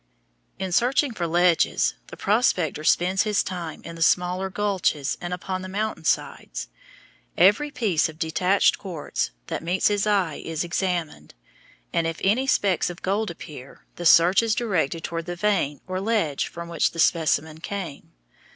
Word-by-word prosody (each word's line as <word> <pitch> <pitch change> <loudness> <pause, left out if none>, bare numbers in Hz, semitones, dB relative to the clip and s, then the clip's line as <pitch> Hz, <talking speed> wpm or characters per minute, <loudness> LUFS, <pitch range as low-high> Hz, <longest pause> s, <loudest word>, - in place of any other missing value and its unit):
In 190 -1 -4
searching 250 - +2
for 175 -5 -2
ledges 175 0 +3
the - - -11
prospector 185 - +1
spends 185 +4 +3
his 210 -1 +1
time 175 -4 -6
in 170 - -8
the 165 - -9
smaller 180 +3 +2
gulches 190 -8 0
and 175 - -5
upon 185 +1 -4
the 185 - -6
mountain 215 +3 -3
sides. - - -2 0.7
Every 210 +11 +4
piece 210 - +1
of 155 - -11
detached 180 +4 +2
quartz 170 - -3 0.2
that - - -4
meets 180 +5 +1
his 205 0 0
eye 190 -7 +1
is 165 0 -3
examined, 170 - -3 0.6
and 165 - +1
if 165 0 -4
any 230 +8 +2
specks 195 - +2
of 175 0 -9
gold 205 +3 0
appear, 145 -5 -11
the 175 - +1
search 175 +6 +6
is 225 -1 +1
directed 170 - -1
toward 165 0 -4
the 175 - -3
vein 170 -7 0
or 185 0 -3
ledge 200 -10 0
from 170 0 -8
which 170 -2 0
the 165 - -8
specimen 160 -1 +2
came. 180 -5 -6
180 Hz, 160 wpm, -24 LUFS, 165-200 Hz, 0.7 s, search